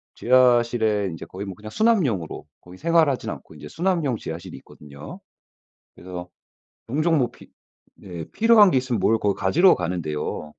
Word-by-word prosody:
지하실에 120 -4 +3
인제 80 - -8
거의 100 +2 -7
뭐 95 - -6
그냥 110 +2 -10
수납용으로 150 - 0 0.2
거의 90 +1 -14
생활하진 160 -4 +1
않고 - - -9
이제 75 - -10
수납용 165 - -1
지하실이 80 -2 -8
있거든요. 75 0 -12 0.8
그래서 90 0 -9 0.6
종종 155 +6 +1
뭐 125 -3 +1
피 - - -17 0.5
네. 85 -4 -9
필요한 220 -4 +5
게 130 - +2
있으면 125 -4 -1
뭘 110 +3 +2
거 100 -1 +1
가지러 180 +4 +4
가는데요. 85 -4 -4
115 Hz, 345 characters per minute, -23 LUFS, -, 0.8 s, 필요한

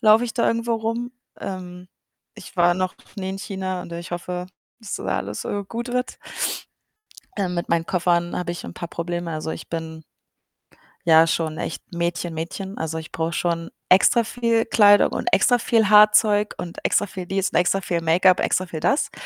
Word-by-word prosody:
Laufe 220 +1 +6
ich 230 - -5
da 235 - +2
irgendwo 230 0 0
rum. 230 +2 -3 0.3
Ähm. 180 -1 -7 0.5
Ich - - -12
war 175 0 +4
noch 185 0 -2 0.2
nie 190 -2 -4
in 195 - -5
China 190 -2 -4
und 170 - -10
ich 170 +2 -7
hoffe, 180 +1 -4 0.3
dass 220 -3 -6
da - - -8
alles, 105 +2 -5
äh, 205 - -2
gut 235 +3 -4
wird. 250 +1 -2 1.2
Äh, 195 -2 0
mit 175 -1 -3
meinen 165 0 +1
Koffern 175 -1 +1
habe 175 -1 -2
ich 175 - -7
'n - - -8
paar 170 - -7
Probleme. 175 0 -4
Also, 155 0 -3
ich - - -8
bin 160 -1 -5 1.0
ja 160 -1 +7
schon 160 -1 -1
echt - - -4
Mädchen-Mädchen. 170 +3 -3
Also, 160 0 -3
ich 160 0 -8
brauche 165 +1 -2
schon 170 -1 -1 0.2
extra 215 +6 +5
viel 230 0 +1
Kleidung 205 -2 +5
und - - -3
extra 245 -2 +4
viel 220 -2 +2
Haarzeug 210 0 +5
und 170 -1 -7
extra 205 - +2
viel 185 -1 -7
dies 195 +1 0
und - - -2
extra 180 +2 +2
viel 175 -2 -1
Make-up, 180 +3 +4
extra 185 - +1
viel 165 -2 -6
das, 280 - +1
180 Hz, 185 wpm, -23 LUFS, 170-210 Hz, 1.2 s, ja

